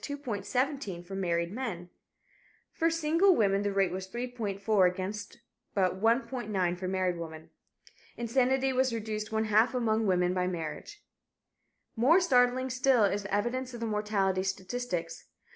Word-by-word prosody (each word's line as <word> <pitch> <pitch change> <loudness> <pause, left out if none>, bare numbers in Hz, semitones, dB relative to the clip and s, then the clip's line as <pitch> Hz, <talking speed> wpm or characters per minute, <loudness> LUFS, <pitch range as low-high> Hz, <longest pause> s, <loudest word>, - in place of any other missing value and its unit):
17 255 - -2
for 185 +2 -10
married 170 -3 -1
men. 195 -7 -5 0.8
For 330 - +2
single 330 +4 +3
women 200 -2 +2
the 205 0 -1
rate 195 -2 +1
was 185 0 -5
3.4 215 -4 0
against 190 +3 -6 0.4
but 190 -1 +1
1.9 215 -6 0
for 185 - -3
married 185 -2 -1
women. 160 -1 -8 0.7
Insanity 260 +3 +1
was 260 0 +2
reduced 215 -1 -4
one 220 0 +1
half 220 +4 +3
among 225 -3 +1
women 180 -1 +2
by 180 -1 0
marriage. 180 - -6 0.9
More 265 +10 +5
startling 255 -5 +2
still 255 -2 +3
is 200 0 +1
the 200 - -8
evidence 245 +4 -2
of - - -7
the 230 - -3
mortality 210 -3 0
statistics. 190 -3 -4
215 Hz, 140 wpm, -30 LUFS, 185-250 Hz, 0.9 s, More